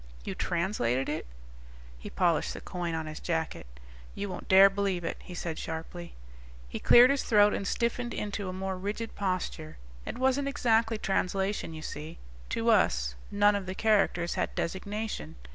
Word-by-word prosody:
"You - - -3
translated 170 - 0
it?" 150 - -3 0.7
He - - -8
polished - - +1
the - - -6
coin 175 -2 -3
on 160 -1 -3
his 155 0 -7
jacket. 160 - -3 0.5
"You 200 0 -4
won't 185 - -7
dare 190 +1 +8
believe 195 -3 -1
it," 165 - -3
he 180 - -10
said 165 -1 -4
sharply. 165 +2 -6 0.5
He - - -5
cleared 245 +2 +7
his 280 - +1
throat 210 -2 +5
and 195 - -2
stiffened 240 0 -1
into 205 -2 -3
a - - -3
more 190 0 -4
rigid 210 +4 -4
posture. 185 -5 -3 0.3
"It - - -6
wasn't 265 +2 +1
exactly 230 -4 +2
translation. 195 -3 -1
You 155 - -8
see, 155 +2 -7 0.3
to 230 0 +2
us 65 - +2 0.2
none 205 0 +4
of 195 -2 -3
the 185 - -4
characters 195 -6 +2
had - - -2
designation. 195 - -4
190 Hz, 165 wpm, -29 LUFS, 165-210 Hz, 0.7 s, dare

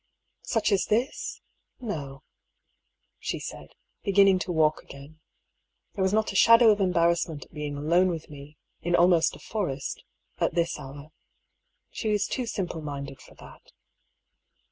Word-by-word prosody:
"Such 225 -2 0
as 195 -3 +2
this? 235 +5 -1 0.4
No," 145 - -6 1.0
she - - -3
said, - - -9 0.3
beginning 195 -2 +4
to 180 +1 -3
walk 155 -2 +2
again. 140 +3 -13 0.7
There 195 - -4
was 190 0 +2
not 215 +1 +1
a - - -9
shadow 230 +2 +7
of 205 -1 +1
embarrassment 170 -5 +1
at - - -28
being 150 -2 -4
alone 170 +5 +3
with 165 -3 -4
me, 145 +1 -12 0.2
in 175 +1 +1
almost 175 -2 +4
a - - -13
forest, 145 -11 -4 0.4
at - - 0
this 170 -1 0
hour. 140 +3 -10 0.8
She 220 - -3
is 210 -1 +1
too 250 -2 -3
simple 180 -7 -3
minded 140 -2 -6
for - - -17
that. - - -16
170 Hz, 145 wpm, -27 LUFS, 150-200 Hz, 1.0 s, shadow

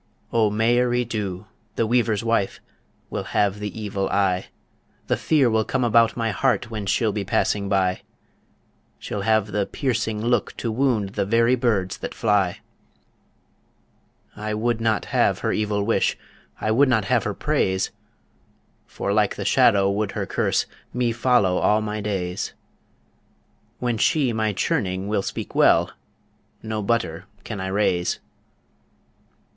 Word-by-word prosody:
O 110 -2 +3
Mairi 120 +3 +2
Dhu, 105 -4 -4 0.3
the 115 - +1
weaver's 115 -2 +1
wife, 115 -4 0 0.5
Will - - -3
have 100 0 +2
the 105 0 -5
evil 100 -2 -2
eye; 95 -2 +1 0.6
The - - +1
fear 150 -5 +2
will 110 -1 +2
come 130 +3 -1
about 115 0 +3
my 115 -1 0
heart 115 +3 0
When 105 -3 -4
she'll 110 +2 +2
be 100 0 -3
passing 100 +1 0
by; 95 -2 +1 1.0
She'll 105 - -5
have 110 0 +1
the 100 -1 0
piercing 115 -5 -1
look 120 0 0
to 115 - -2
wound 115 -4 +1
The 95 - -2
very 115 +3 +3
birds 110 -7 0
that - - -6
fly. 100 -5 +1 1.7
I 105 0 -3
would 115 +1 0
not 110 -1 +1
have - - +2
her - - +2
evil 105 -1 0
wish, 115 +2 +1 0.4
I 110 - 0
would 135 +5 +4
not 110 -5 +2
have - - +2
her - - -3
praise, 95 0 0 1.0
For 100 - -3
like 105 -1 +2
the - - -5
shadow 100 -1 +4
would 100 +1 -1
her - - -2
curse, - - 0 0.3
Me 125 -1 +1
follow 115 -6 +2
all 105 - +3
my 105 0 -3
days 95 -3 -3 1.2
When 120 -3 -1
she 135 -3 +2
my 110 -1 0
churning 95 -1 -1
will 105 -1 0
speak - - -5
well, - - +4 0.7
No 110 -1 -3
butter 100 -5 -1 0.2
can 105 -4 -5
I 95 - -3
raise. 95 -3 0
105 Hz, 145 wpm, -23 LUFS, 100-115 Hz, 1.7 s, would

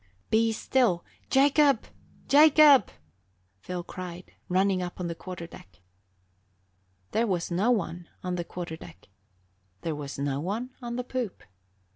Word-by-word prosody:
"Be 225 +1 +3
still! 220 -5 +1 0.2
Jacob, 280 -2 +4 0.4
Jacob!" 295 - +7 0.7
Phil 180 - -5
cried, 180 -1 -8 0.2
running 190 +1 +2
up 175 0 -6
on 180 - -2
the 170 - -2
quarter 175 0 -8
deck. 95 - -15 1.3
There 230 +1 +1
was 180 -3 -1
no 190 +7 +2
one 175 -7 -1
on 180 0 -2
the 175 -1 -2
quarter 170 -2 -6
deck; 95 - -14 0.7
there 165 - -2
was 145 -2 -6
no 140 0 -1
one 215 - -3
on 240 -1 -5
the 250 - -2
poop. 250 -5 -4
185 Hz, 135 wpm, -27 LUFS, 170-245 Hz, 1.3 s, Jacob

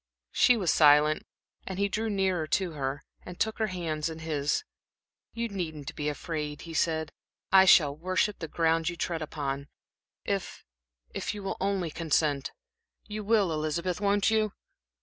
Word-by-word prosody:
She 250 - +5
was 185 -7 +2
silent, 150 0 +5 0.4
and 190 - -4
he 200 +1 +2
drew 220 +3 -2
nearer 190 -5 0
to 185 +1 0
her 140 -2 -3 0.2
and 180 -1 -10
took 220 0 0
her 220 - +1
hands 165 -5 -2
in 160 - -7
his. 155 - -1 0.7
"You 235 0 -2
needn't 160 -8 -5
be 150 0 -1
afraid," 150 -1 -4
he 165 - -8
said. 160 -1 0 0.4
"I 190 0 +8
shall 150 -6 +6
worship 185 +5 0
the 165 - -4
ground 165 +1 +1
you 170 - -5
tread 170 -1 -2
upon, 140 -2 -4 0.6
if - - -3 0.5
if - - -3
you 205 - -7
will 195 - -3
only 190 -4 0
consent. 150 -3 0 0.5
You 215 0 -5
will, 205 -5 +2
Elizabeth, 165 +5 -2
won't 205 +1 +2
you?" 215 -2 +1
165 Hz, 160 wpm, -28 LUFS, 155-195 Hz, 0.7 s, I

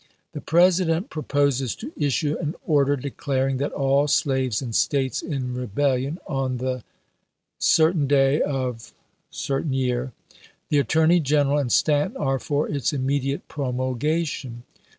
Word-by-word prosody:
The - - -7
President 175 +3 +2
proposes 140 -5 0
to 270 +7 -8
issue 145 +1 0
an 155 0 -3
order 145 -3 +3
declaring 135 0 -2
that, 140 +2 -2
all 140 +1 +2
slaves 130 -5 +1
in 120 -4 -5
States 135 0 +1
in 130 -5 -3
rebellion 130 - -1
on 135 -3 -2
the 130 -1 -3 1.2
day 135 +1 +3
of 130 -5 -3 0.4
The 140 - -4 1.2
Attorney 160 +5 +3
G 150 -1 +1
eneral 145 0 +2
and 125 -4 -3
Stanton 145 -1 +2
are 135 -2 0
for 145 +2 -1
its 140 -5 -1
immedi 135 -1 0
ate - - -8
promulgation. 130 -1 -2
140 Hz, 125 wpm, -24 LUFS, 130-150 Hz, 1.2 s, order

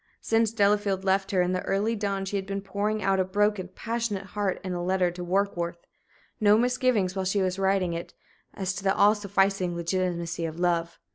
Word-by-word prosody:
Since 225 -1 +2
Delafield 205 -3 +2
left 195 0 +1
her 185 -2 +2
in 180 - 0
the 185 0 -1
early 205 +4 0
dawn 200 -2 -2
she 195 - -4
had 195 -1 -2
been 195 0 -3
pouring 205 +2 -2
out 195 -1 +2
a - - +4
broken, 205 0 0
passionate 225 -4 -2
heart 205 -3 -1
in 185 -1 -3
a 175 0 -3
letter 185 -1 +1
to 175 0 -7
Warkworth. 175 -2 -1 0.6
No 210 -1 +5
misgivings 245 -6 +1
while 190 - -1
she 190 +1 +1
was 185 +1 -1
writing 190 -2 +1
it 170 +1 -6 0.4
as 185 -2 -2
to 195 - -6
the 195 0 +2
all 205 +1 +6
sufficing 195 -3 0
legitimacy 170 -1 -2
of 160 +1 -5
love! 170 -1 0
195 Hz, 200 wpm, -27 LUFS, 180-205 Hz, 0.6 s, all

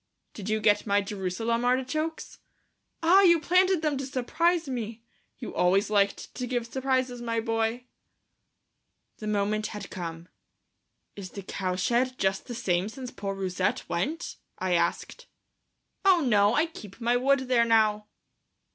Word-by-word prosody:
"Did 210 -1 -6
you 215 0 +1
get 210 0 +3
my 200 0 +3
Jerusalem 210 +4 -2
artichokes?" 265 +6 -1 0.6
"Ah, 365 +4 +6
you 340 -3 +6
planted 365 +1 +3
them 300 -3 +1
to 270 - -3
surprise 320 +6 0
me! 230 -3 -5 0.3
You 235 - -7
always 195 +4 +2
liked 200 -1 +1
to 250 - -4
give 245 -1 -1
surprises, 255 0 -1
my 230 -1 -1
boy." 225 +1 -1 1.3
The 215 - -7
moment 210 +1 0
had 210 -3 -8
come. 170 -2 -6 0.9
"Is 195 -2 -7
the 200 - -8
cowshed 215 +9 -1
just 190 0 -1
the 240 - -5
same 190 -4 0
since 255 +1 -8
poor 195 -1 -4
Rousette 185 -2 -1
went?" 190 - -3 0.2
I 185 -1 -1
asked. 170 - -1 0.8
"Oh, 380 -3 +6
no; 210 -5 +3
I 305 - +3
keep 215 - -11
my 240 +1 +1
wood 270 +2 +3
there 250 -2 +3
now." 215 -2 +2
230 Hz, 145 wpm, -27 LUFS, 200-260 Hz, 1.3 s, Ah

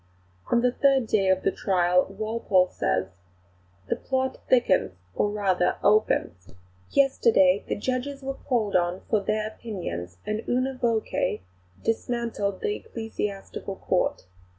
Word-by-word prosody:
On 235 - +4
the 250 0 +3
third 270 -1 +3
day 195 -3 +2
of 190 0 +2
the 195 - +2
trial 180 -2 +2
Walpole 200 -2 +1
says: 95 +10 -1 0.8
"The - - 0
plot 260 -1 -2
thickens, 240 - +3 0.2
or 205 - +1
rather 195 -4 +1
opens. 205 - +1 0.3
Yesterday 220 -8 +4
the - - -1
judges 260 +5 -3
were 270 0 -2
called 230 -7 -1
on 175 +1 +1
for 215 - +4
their 215 +2 -1
opinions, 170 - -6
and 215 +1 -2
una 255 +2 +1
voce 230 - 0 0.4
dismantled 225 -3 -1
the 425 0 -1
Ecclesiastical 210 - -5
Court. 185 - -1
215 Hz, 130 wpm, -26 LUFS, 185-245 Hz, 0.8 s, On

